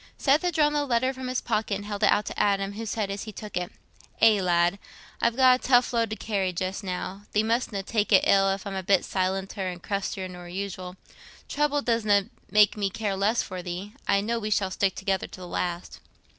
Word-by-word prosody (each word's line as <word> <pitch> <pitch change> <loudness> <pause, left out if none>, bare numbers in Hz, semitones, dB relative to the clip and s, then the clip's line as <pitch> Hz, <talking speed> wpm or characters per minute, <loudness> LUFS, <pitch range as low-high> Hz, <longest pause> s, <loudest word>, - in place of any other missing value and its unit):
Seth 285 +2 +3
had 355 -2 -1
drawn 295 -1 +3
the 295 -1 +1
letter 255 -1 +1
from 260 -1 -6
his 255 0 -1
pocket 215 -3 -1
and 205 +1 -6
held 205 -1 -5
it - - +5
out 210 - +2
to - - -5
Adam, 200 -1 +1
who 225 +2 -6
said, 205 -2 -2
as 200 +2 -5
he 215 - -7
took 210 0 -9
it, 180 0 -2 0.5
"Aye, 220 -2 +6
lad, 175 +1 +2 0.4
I've 235 0 +2
got 255 -1 +5
a - - -20
tough 245 -1 +4
load 230 -2 +1
to 215 - -3
carry 200 -4 -1
just 185 +4 -3
now—thee 195 +3 -3
mustna 225 -3 -1
take 210 +1 -1
it 190 - +6
ill 195 0 +4
if 195 +1 -2
I'm 200 - -4
a 190 - -2
bit 190 +1 +3
silenter 190 0 -2
and 175 0 -10
crustier 195 -1 -3
nor 180 -1 -10
usual. 185 -1 -5 0.5
Trouble 290 0 0
doesna 210 -4 +2 0.2
make 210 0 +5
me 205 -2 -1
care 215 0 -3
the - - -4
less 210 +4 +2
for 185 -1 -6
thee. 180 +4 -6
I 200 0 +3
know 230 +3 -1
we 215 -1 -3
shall 195 -2 +1
stick 195 0 0
together 190 -1 -1
to - - -12
the 180 - -8
last." 175 0 -4
200 Hz, 225 wpm, -26 LUFS, 190-225 Hz, 0.5 s, Aye